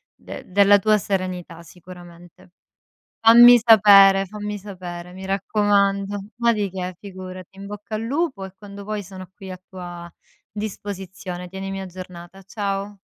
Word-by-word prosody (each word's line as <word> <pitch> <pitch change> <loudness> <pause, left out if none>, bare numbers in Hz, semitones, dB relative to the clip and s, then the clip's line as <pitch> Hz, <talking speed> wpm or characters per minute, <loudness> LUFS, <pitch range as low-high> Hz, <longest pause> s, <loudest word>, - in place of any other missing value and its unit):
de - - -10
della 200 +1 +5
tua 215 +1 +3
serenità 185 -4 -4
sicuramente. 175 0 -15 0.7
Fammi 240 +2 +8
sapere, 200 -3 +7
fammi 210 +1 -6
sapere, 180 -3 -9
mi 190 +1 -9
raccomando. 200 0 +1 0.2
Ma 235 -1 +2
di 205 -3 -2
che, 185 -1 -5
figurati. 185 -1 -10
In 200 - -9
bocca 210 +1 -7
al 220 - -5
lupo 270 - -2
e 190 0 -10
quando 200 0 -11
vuoi 210 0 -4
sono 185 0 -11
qui 190 -1 -11
a 185 0 -9
tua 175 -2 -9 0.4
disposizione. 190 -3 -7
Tienimi 195 +1 -6
aggiornata. 185 0 -10
Ciao. 200 0 -4
195 Hz, 135 wpm, -22 LUFS, 185-205 Hz, 0.7 s, Fammi